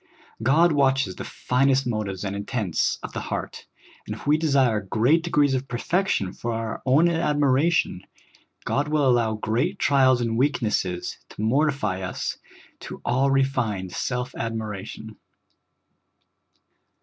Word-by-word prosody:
God 155 +9 +4
watches 135 -8 +2
the - - -6
finest 135 +1 +1
motives 105 -5 -3
and 100 0 -3
intents 100 - -1
of - - -7
the - - -3
heart, - - -5 0.4
and - - -4
if - - -12
we 145 +1 +4
desire 135 -8 +2
great 120 - +2
degrees 150 -5 +2
of 130 +1 -2
perfection 125 - -1
for 120 0 -4
our 115 -1 -4
own 145 +7 +5
admiration, 150 - +1 0.6
God 145 +2 0
will 150 -2 +2
allow 120 -3 +3
great 110 +4 -1
trials 130 -3 +4
and 115 -1 -1
weaknesses 105 -10 -1
to 105 - -7
mortify 125 -6 +1
us 90 - -4 0.4
to - - -8
all 130 +3 +2
refined 130 -9 0
self 125 +5 -3
admiration. 110 -1 -5
125 Hz, 130 wpm, -24 LUFS, 110-140 Hz, 0.6 s, own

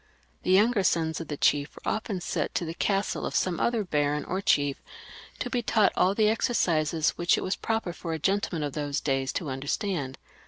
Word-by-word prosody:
The - - -4
younger 210 +4 +4
sons 165 -3 +1
of 165 - -7
the 145 - -4
chief 145 +1 +2
were - - -10
often 215 -4 -3
sent - - -2
to 175 - 0
the 165 - -4
castle 195 +3 0
of - - -3
some 180 -2 +1
other 235 -3 +1
baron 150 -4 0
or 190 +1 -2
chief 145 -9 +2 0.6
to - - -3
be 245 - -1
taught 215 -2 +3
all 190 +2 +3
the 215 0 +3
exercises 165 -8 +1
which 175 +1 +3
it - - -2
was 185 - -1
proper 225 -6 -2
for 170 -1 -6
a - - -1
gentleman 190 -1 0
of 145 -2 -3
those 145 -1 -2
days 135 -2 0
to 160 - -3
understand. 140 - -2
170 Hz, 205 wpm, -27 LUFS, 150-200 Hz, 0.6 s, younger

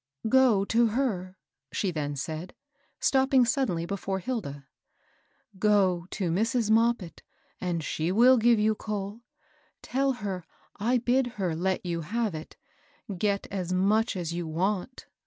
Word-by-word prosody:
" 140 +11 -6
Go 245 -6 +4
to 230 +3 +3
her," 205 -6 -2 0.3
she 195 - -1
then 145 -3 -3
said, 155 +5 -5 0.4
stopping 265 -1 +4
suddenly 225 -9 0
hefore 195 +1 -3
Hilda, 170 - -4 0.3
— - - -38
" 200 -3 -27
Go 190 -4 +3
to 185 -5 -2
Mrs. 225 +4 +1
Moppit, 225 -5 +1 0.4
and 175 -3 -2
she 160 +3 -1
will 245 +6 +6
give 235 +1 +5
you 215 +1 +3
coal. 210 0 -5 0.6
Tell 270 +1 +1
her 200 -6 -4 0.3
I 235 +5 +2
bid 250 +2 +2
her 180 -5 -1
let 185 +3 -1
you 170 -1 -2
have 215 +5 -1
it; 155 0 -8 0.6
get 200 +2 0
as 185 -2 -2
much 210 +5 +2
as 170 -2 -3
you 175 -1 -3
want." 190 +8 -2
200 Hz, 150 wpm, -28 LUFS, 175-230 Hz, 0.6 s, will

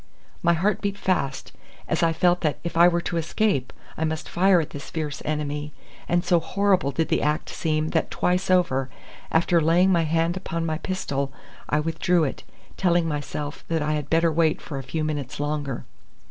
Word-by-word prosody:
My 170 0 +4
heart 190 +6 +1
beat 200 -1 -2
fast 140 -10 -1 0.4
as - - 0
I 165 - +4
felt 175 +2 +2
that 155 -3 0
if 170 - -4
I 170 +1 +7
were 175 -1 +2
to 170 - -3
escape 165 - 0 0.2
I 160 - -2
must 160 0 -2
fire 185 +1 +4
at 155 - -3
this 145 - -8
fierce 150 -3 -4
enemy, 150 -1 -3 0.4
and 175 +1 +2
so 175 -2 +4
horrible 190 -3 +1
did 160 +3 -1
the - - +2
act 150 +1 0
seem 155 -1 -1
that 160 - 0
twice 180 +1 0
over, 135 -8 +2 0.4
after 170 +1 +3
laying 175 +4 +4
my 170 -3 +3
hand 165 +2 +1
upon 170 -3 -3
my 160 -1 -2
pistol, 140 -8 -2 0.4
I 150 - +2
withdrew 165 +2 +1
it, 140 - -2 0.4
telling 175 -2 +2
myself 145 -1 -4
that 165 -2 0
I 150 - 0
had 150 -2 -3
better 165 0 +3
wait 160 0 +2
for 140 -3 -6
a - - -6
few 155 +4 -3
minutes 145 -5 -3
longer. 145 -3 -2
160 Hz, 190 wpm, -24 LUFS, 150-175 Hz, 0.4 s, I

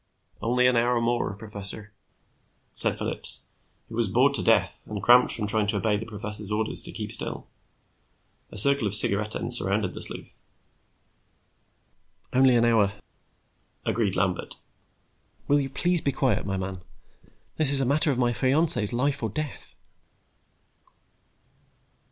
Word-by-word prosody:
"Only 125 +3 0
an 125 0 +3
hour 120 +1 +1
more, 120 -3 -2
professor," 105 0 -4 0.8
said - - +8
Phillips, - - -1 0.4
who - - -14
was - - 0
bored - - +2
to - - 0
death - - 0
and 105 -1 -6
cramped 120 +5 +4
from 105 - -3
trying 105 0 0
to 105 0 -1
obey 105 0 -1
the 110 +2 -6
professor's 105 -1 -4
orders 110 +1 +1
to - - -7
keep - - -6
still. - - -1 1.0
A - - -12
circle 140 +1 +6
of 100 - +5
cigarette 105 +1 +4
ends 120 +1 +3
surrounded 100 -3 0
the - - -9
sleuth. - - -6 1.9
"Only 130 -1 +3
an 120 0 +2
hour," 110 -4 +1 0.9
agreed 105 -3 0
Lambert. 90 0 -2 0.9
"Will 145 +1 +2
you 135 - -5
please 175 +5 -2
be 140 - -1
quiet, 130 -5 -2
my 95 -1 -3
man? 95 -1 -6 0.8
This 155 -3 +1
is 140 - +1
a 135 - -1
matter 150 +4 0
of 130 - -3
my 120 -1 0
fiancée's 135 -3 -1
life 140 +3 -2
or 110 - -3
death." 150 +5 -8
115 Hz, 145 wpm, -24 LUFS, 105-130 Hz, 1.9 s, said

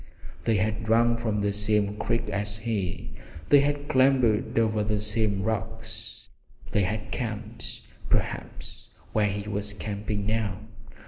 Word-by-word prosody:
They 115 - +3
had 105 +2 0
drunk 115 +1 +4
from 110 -3 0
the 100 0 +1
same 105 0 +1
creek 115 - 0
as 105 0 -1
he, 105 -5 -2 0.4
they 145 - +8
had 145 +1 0
clambered 130 -6 +3
over 110 -2 +3
the 105 0 0
same 105 -2 0
rocks, 110 0 -4 0.4
they 105 - +3
had 105 +3 -2
camped 115 -1 -4 0.3
perhaps - - -2 0.2
where 105 -1 +3
he 100 +1 -3
was 100 0 -2
camping 105 -1 -3
now! 110 -3 0
110 Hz, 135 wpm, -27 LUFS, 105-115 Hz, 0.4 s, they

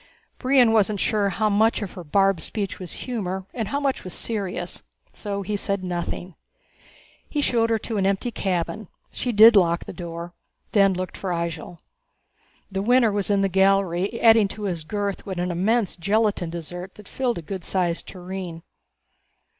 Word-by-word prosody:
Brion 255 -3 +4
wasn't 210 -2 +2
sure 205 -1 +1
how 215 +3 0
much 215 +2 +2
of 195 - -5
her 180 - -9
barbed 195 +2 +2
speech 200 +3 -2
was 180 -3 -7
humor 190 -6 -3
and 225 -4 -3
how 280 +7 -1
much 275 -2 -1
was 185 - -6
serious, 190 -5 -3 0.3
so 200 -1 -4
he 205 +2 -2
said 200 -1 -1
nothing. 175 0 -4 1.0
He 300 - -2
showed 230 -5 +2
her 225 - +3
to 220 0 -4
an 195 -1 +2
empty 200 +5 0
cabin 190 +1 -2 0.2
she 245 - -2
did 220 +1 +8
lock 170 -3 +3
the - - -7
door 170 0 -7 0.4
then 195 -3 +4
looked 185 0 -4
for 195 - -4
Ihjel. 170 0 -3 0.9
The 195 0 -1
Winner 240 +1 +4
was 205 0 -1
in 200 -1 +3
the 195 - +3
galley 195 +1 +2
adding 225 -2 +6
to 210 +2 -8
his 175 -5 -2
girth 200 +4 -3
with 190 -2 -4
an 175 +1 -1
immense 200 +4 +1
gelatin 200 -1 +1
dessert 175 +3 -7
that 210 -2 -14
filled 250 -3 -1
a 170 - -6
good 190 +2 -6
sized 175 -3 -1
tureen. 180 -2 -7
195 Hz, 175 wpm, -24 LUFS, 180-215 Hz, 1.0 s, did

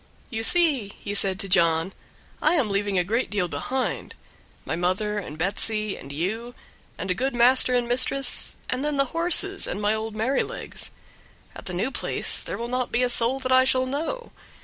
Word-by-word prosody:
"You 225 -2 -3
see," 275 - +2
he 205 - -5
said 195 -1 +1
to 195 - -4
John, 170 -1 +2 0.5
"I 310 +3 +3
am 265 -10 +1
leaving 200 -1 0
a 180 - +3
great 230 +8 -1
deal 200 -4 -1
behind; 245 - -3 0.5
my - - -2
mother 185 +5 -1
and 155 -6 -8
Betsy, 210 +3 0
and 140 - -10
you, 220 +11 -4 0.4
and 190 - -3
a - - +3
good 260 +6 -2
master 250 +1 +5
and 245 -1 0
mistress, 260 +3 +4
and 255 +2 -3
then 295 -1 -1
the 275 - +4
horses, 355 +4 +2
and 190 - -4
my 210 +1 +1
old 220 0 -4
Merrylegs. 230 +6 -3 0.7
At - - -10
the 180 - -5
new 220 +9 -1
place - - -1
there - - -6
will 235 - -4
not 250 0 -2
be 245 - +1
a 250 - +1
soul 240 +2 +3
that 260 0 -2
I 260 0 +6
shall 260 0 +2
know. 320 - -4
230 Hz, 195 wpm, -24 LUFS, 195-260 Hz, 0.7 s, I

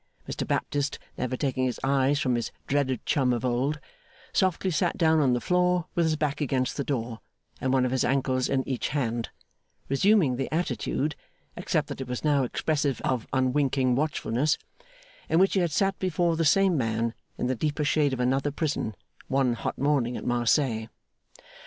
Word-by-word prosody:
Mr - - -4
Baptist, 145 0 -1 0.2
never 130 0 -2
taking 130 -2 0
his 125 - -2
eyes 140 +1 +2
from 130 -4 +1
his 120 -1 -1
dreaded 135 -3 0
chum 130 -4 +2
of 120 0 -1
old, 130 +5 0 0.5
softly 185 0 +1
sat 175 +2 0
down 160 -2 +4
on 135 -4 +3
the 120 - +1
floor 180 +2 +2
with 170 - +2
his 155 - +1
back 150 -1 -2
against 130 -2 0
the 140 - -2
door 120 -5 -3 0.4
and 130 - 0
one 130 -1 +3
of 125 - -1
his 130 -1 +1
ankles 130 -1 +1
in 130 -1 0
each 130 -2 -1
hand: 120 -5 -2 0.6
resuming 150 - +3
the 135 - -3
attitude 155 -2 -1 0.4
(except - - -1
that - - -6
it 130 - -5
was 125 -1 -4
now 145 -2 +3
expressive 145 +2 -1
of 125 -3 -1
unwinking 130 -1 +2
watchfulness) 145 0 0 0.7
in 160 - +3
which 190 +2 +4
he 195 - +3
had 175 -3 +1
sat 195 +5 +1
before 175 -2 +1
the 165 0 0
same 195 +3 +4
man 115 -3 0 0.2
in - - -2
the 130 - +1
deeper 150 +4 -1
shade 150 -1 +2
of 130 - -3
another 135 +3 +1
prison, 145 - -2 0.3
one 130 -2 +2
hot 115 - -4
morning 135 -4 +1
at - - -7
Marseilles. 120 -1 +1
135 Hz, 180 wpm, -27 LUFS, 125-155 Hz, 0.7 s, down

